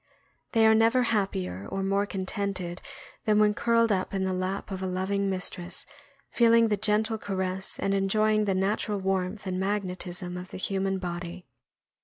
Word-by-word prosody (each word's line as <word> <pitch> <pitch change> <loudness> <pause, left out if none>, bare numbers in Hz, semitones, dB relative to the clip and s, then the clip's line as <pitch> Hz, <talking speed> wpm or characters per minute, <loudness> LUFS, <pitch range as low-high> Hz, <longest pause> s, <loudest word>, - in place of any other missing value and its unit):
They 225 -1 +5
are 220 - +7
never 230 +3 +4
happier 100 - -1
or 195 - -2
more 200 +1 +1
contented 190 -2 -3 0.4
than 215 -1 +3
when 210 0 +4
curled 230 +1 +2
up 190 0 -1
in 190 - 0
the 190 0 0
lap 185 +2 -3
of 190 -1 -4
a 190 - -1
loving 195 +2 -1
mistress, 180 -1 -3 0.5
feeling 230 -1 +5
the 210 - +3
gentle 215 +2 +1
caress 190 -1 -1
and 195 0 0
enjoying 215 +2 +2
the 195 -2 +1
natural 205 +2 0
warmth 190 +1 -1
and 185 -1 -2
magnetism 185 -2 -3
of 180 +1 -8
the - - -7
human 195 0 0
body. 175 0 -5
195 Hz, 165 wpm, -27 LUFS, 185-210 Hz, 0.5 s, are